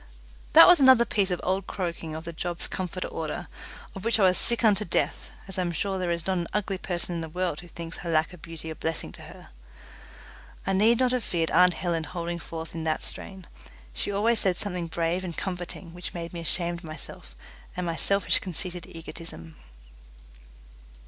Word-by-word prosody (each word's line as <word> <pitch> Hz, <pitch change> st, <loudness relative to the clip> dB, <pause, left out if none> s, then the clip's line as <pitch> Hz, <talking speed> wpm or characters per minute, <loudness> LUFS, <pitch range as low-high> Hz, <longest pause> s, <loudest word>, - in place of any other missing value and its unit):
That -, -, +12 dB
was 355 Hz, -, +8 dB
another 260 Hz, -3 st, +7 dB
piece 200 Hz, -4 st, +1 dB
of 180 Hz, -, 0 dB
old 190 Hz, +1 st, 0 dB
croaking 170 Hz, -4 st, -3 dB
of 160 Hz, +1 st, -6 dB
the 170 Hz, -, -5 dB
job's 175 Hz, +1 st, -1 dB
comforter 185 Hz, 0 st, -3 dB
order, -, -, -4 dB, 0.5 s
of 195 Hz, -, -8 dB
which 230 Hz, 0 st, +2 dB
I -, -, +5 dB
was 185 Hz, -1 st, +6 dB
sick 235 Hz, 0 st, +2 dB
unto 210 Hz, -2 st, +4 dB
death, 175 Hz, -, -1 dB, 0.2 s
as 190 Hz, -1 st, -3 dB
I -, -, +3 dB
am 175 Hz, -1 st, 0 dB
sure 190 Hz, +3 st, -1 dB
there 180 Hz, -1 st, -1 dB
is 170 Hz, -1 st, -1 dB
not 190 Hz, -1 st, +1 dB
an 170 Hz, -, -2 dB
ugly 195 Hz, -2 st, -1 dB
person 175 Hz, -1 st, -2 dB
in 170 Hz, -, -2 dB
the 160 Hz, -, -5 dB
world 180 Hz, -1 st, -1 dB
who 175 Hz, -, -10 dB
thinks 170 Hz, -1 st, -7 dB
her 170 Hz, -, -5 dB
lack 160 Hz, +1 st, +2 dB
of 175 Hz, -, -12 dB
beauty 165 Hz, -1 st, -7 dB
a -, -, -6 dB
blessing 160 Hz, -, -2 dB
to -, -, -11 dB
her. -, -, -12 dB, 1.2 s
I 195 Hz, -, +1 dB
need 220 Hz, +5 st, +5 dB
not 255 Hz, 0 st, +3 dB
have 250 Hz, -2 st, 0 dB
feared 165 Hz, -4 st, 0 dB
aunt 180 Hz, -1 st, +6 dB
Helen 165 Hz, -2 st, -1 dB
holding 170 Hz, +1 st, -4 dB
forth 165 Hz, 0 st, -7 dB
in 165 Hz, -1 st, -4 dB
that 155 Hz, -1 st, 0 dB
strain. 190 Hz, -2 st, -7 dB, 0.5 s
She 130 Hz, -, 0 dB
always 220 Hz, +3 st, +2 dB
said 185 Hz, -2 st, +2 dB
something 180 Hz, -4 st, -1 dB
brave 170 Hz, +2 st, -1 dB
and 175 Hz, -3 st, -5 dB
comforting 175 Hz, -2 st, -4 dB
which 175 Hz, +1 st, -5 dB
made 170 Hz, 0 st, -5 dB
me 170 Hz, -, -4 dB
ashamed 170 Hz, +1 st, 0 dB
of -, -, -18 dB
myself 155 Hz, -, -9 dB, 0.4 s
and 180 Hz, -, -1 dB
my 165 Hz, -1 st, -1 dB
selfish 200 Hz, +4 st, +3 dB
conceited 180 Hz, -1 st, -4 dB
egotism. 165 Hz, -, -8 dB
175 Hz, 205 wpm, -27 LUFS, 165-190 Hz, 1.2 s, That